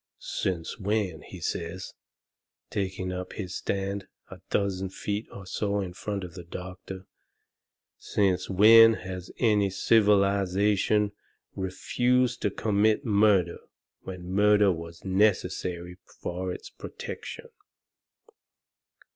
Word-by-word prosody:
"Since 85 0 -3
when," 100 -5 -1
he - - -10
says, 85 +2 -4 0.8
taking 95 -2 -2
up 90 0 -5
his 95 -3 -5
stand 100 0 -3 0.2
a - - -10
dozen 95 -2 0
feet 105 +3 -4
or 100 - -9
so 100 +1 -1
in 95 -3 -4
front 100 +1 -4
of 90 -2 -8
the 90 0 -8
doctor, 95 +2 -8 0.9
"since 95 -3 0
when 115 +4 +8
has 95 -2 -7
any 105 -4 +3
civilization 100 0 +3 0.4
refused 120 +6 0
to - - +2
commit 105 +5 +1
murder 100 -5 +3 0.4
when 90 -2 -8
murder 105 0 +5
was 85 0 -7
necessary 90 -3 0 0.2
for 90 +1 -3
its - - -7
protection?" - - -8
95 Hz, 105 wpm, -27 LUFS, 90-105 Hz, 0.9 s, when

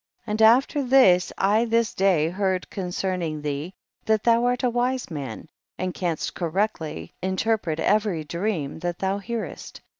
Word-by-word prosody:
50. 225 - -7
And 215 +1 -1
after 250 +6 +5
this 245 -9 +5
I 210 +4 +3
this 230 -1 +1
day 180 -5 +2
heard 190 0 -1
concerning 180 -4 -3
thee, 150 +5 -4 0.3
that 220 -1 +2
thou 235 0 +4
art 245 +1 0
a 250 - +3
wise 245 -2 -1
man, 145 0 -6 0.3
and 185 -1 -3
canst 170 -4 -2
correctly 165 - -2
interpret 190 -3 -1
every 205 -6 +1
dream 170 -3 -3
that 175 0 -3
thou 195 +1 -1
hearest. 225 +2 -6
190 Hz, 150 wpm, -24 LUFS, 170-225 Hz, 0.3 s, after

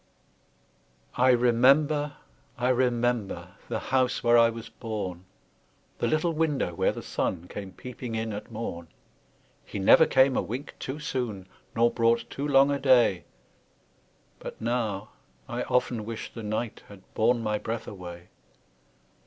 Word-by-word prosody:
I 125 +1 +4
remember, 135 +5 +4 0.4
I 125 0 +1
remember, 120 -7 0 0.2
The 115 - -1 0.2
house 130 -1 +2
where 120 0 +5
I 115 -1 +6
was 115 0 -7
born, 100 -6 -5 0.7
The - - +1
little 155 +2 +1
window 150 - 0
where - - +1
the - - -7
sun 90 -1 -2
Came 100 -1 -7
peeping 125 -2 -7
in 110 -1 -2
at 105 +3 -7
morn; 95 -7 -5 0.8
He - - -7
never 100 +11 +6
came 130 0 +4
a - - +2
wink 130 +6 -6
too 135 +2 -4
soon, 120 -10 -3 0.3
Nor 115 +1 +4
brought 115 0 +2
too 140 +2 -3
long 140 0 +5
a 140 - 0
day, 120 - +4 1.1
But - - -8
now, 110 -4 -2 0.4
I - - -3
often 125 -3 0
wish 115 +1 -6
the 115 - -7
night 110 +2 -3
Had 100 -2 -14
borne 115 +1 +2
my 105 -1 0
breath 115 +1 -4
away! 90 -2 -9
115 Hz, 145 wpm, -27 LUFS, 105-130 Hz, 1.1 s, I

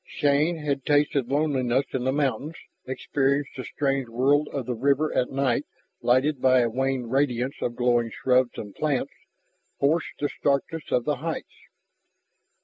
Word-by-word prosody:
Shann 150 +4 +1
had 140 -3 -2
tasted 145 -3 +2
loneliness 135 -3 +1
in 130 -1 -1
the 130 - +2
mountains, 145 +2 -1 0.3
experienced 135 +2 0
the 130 - -5
strange 135 -2 -1
world 140 +5 +2
of 135 -3 -3
the 125 - -2
river 140 +5 +1
at 125 - +1
night 135 -3 0 0.4
lighted 130 +3 +2
by 130 -1 +5
the 120 -1 0
wan 130 0 -1
radiance 130 0 0
of 120 - -2
glowing 120 -1 +2
shrubs 125 +1 +1
and 105 -2 -7
plants, 150 -4 -1 0.7
forced 155 +4 +1
the 145 - +1
starkness 145 +3 -2
of 125 - +1
the 150 - 0
heights. 165 +1 -5
135 Hz, 150 wpm, -25 LUFS, 125-145 Hz, 0.7 s, by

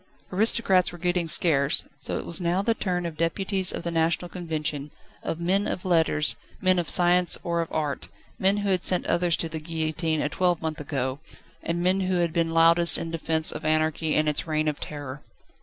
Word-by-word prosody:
Aristocrats 195 -2 +3
were 175 - -10
getting 175 0 -1
scarce, 150 -4 +3
so - - -2
it - - -6
was 170 +1 -2
now 175 +3 0
the 230 - +1
turn 180 -5 -3
of 165 -2 -6
deputies 190 +3 +1
of - - -6
the 170 - -3
National 165 +2 0
Convention, 155 -5 -4 0.3
of 165 - -4
men 190 +4 0
of 180 - -5
letters, 160 -4 +2 0.2
men 185 -1 +2
of 170 - -3
science 180 0 +4
or 170 -1 -1
of 165 - -6
art, 150 -3 -3 0.3
men 195 +2 +2
who 205 -1 -2
had 185 -2 0
sent 180 - +2
others 175 -1 +1
to 165 - -1
the 160 0 -6
guillotine 160 0 -2
a - - 0
twelvemonth 160 -1 -1
ago, 135 -2 -3 0.4
and 170 +1 -3
men 185 +2 +2
who 185 -1 -1
had 170 -2 0
been 165 -1 0
loudest 165 +1 +5
in 165 - -5
defence 160 -1 0
of 155 - -7
anarchy 155 0 0
and 155 0 +1
its 150 +2 -1
Reign 155 0 -1
of 150 -1 -2
Terror. 145 -2 -8
165 Hz, 200 wpm, -25 LUFS, 155-180 Hz, 0.4 s, loudest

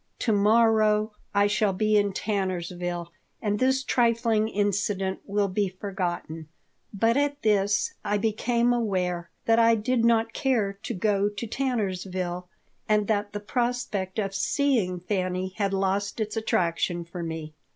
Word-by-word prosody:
"To 230 - +1
morrow 215 0 +4 0.2
I 200 0 +3
shall 205 -1 +2
be 215 +3 +1
in 205 -1 +3
Tannersville 180 -4 -3 0.3
and 205 -1 -1
this 265 +1 +2
trifling 230 -3 +2
incident 200 -2 -1
will 205 0 +1
be 195 +1 0
forgotten." 180 -4 -4 0.4
But 225 +4 +2
at 285 0 0
this 205 -1 +2
I 205 - 0
became 235 +3 +1
aware 185 -7 -1 0.2
that 225 0 +4
I 230 0 +5
did 230 +2 0
not 230 -1 +3
care 230 -7 +1
to - - -4
go 200 +1 +1
to 205 +2 -6
Tannersville 185 -8 -2 0.4
and 210 -1 +3
that 205 -1 0
the 205 - -4
prospect 230 -4 -2
of 195 -3 -1
seeing 210 -4 +1
Fanny 185 0 -2
had 200 -2 0
lost 195 +2 -1
its 215 0 -2
attraction 175 -4 0
for 170 +1 -7
me. 160 -2 -5
205 Hz, 140 wpm, -26 LUFS, 185-225 Hz, 0.4 s, I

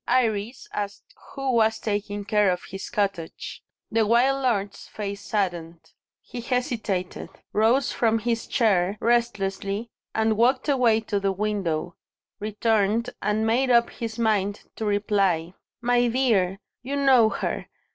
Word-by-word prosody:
Iris 225 -1 0
asked 205 - -5 0.2
who 270 -1 -1
was 225 -2 +3
taking 205 -1 -3
care 210 -1 +3
of 180 -1 -1
his 195 0 -7
cottage. 195 -5 -3 0.3
The 225 0 +3
wild 260 +4 +3
lord's 205 -6 -1
face 200 -1 -5
saddened. 175 -6 -3 0.3
He 240 - -7
hesitated; 230 -7 -2 0.2
rose 230 +5 +3
from 225 -1 +2
his 230 +1 -2
chair 200 -5 +2
restlessly, 215 -2 0 0.2
and 220 -1 +2
walked 255 +5 +3
away 245 -6 +3
to 210 -2 -1
the 195 0 +1
window; 185 -5 -2 0.4
returned, 215 +2 +1
and 210 +1 0
made 250 +4 +2
up 235 -1 +4
his 225 -1 -5
mind 210 -3 +1 0.2
to 220 - -3
reply. 200 -5 +1 0.3
"My 245 0 +3
dear, 225 -7 +2 0.2
you 270 +3 -4
know 265 -5 +5
her. - - -3
220 Hz, 135 wpm, -25 LUFS, 200-235 Hz, 0.4 s, know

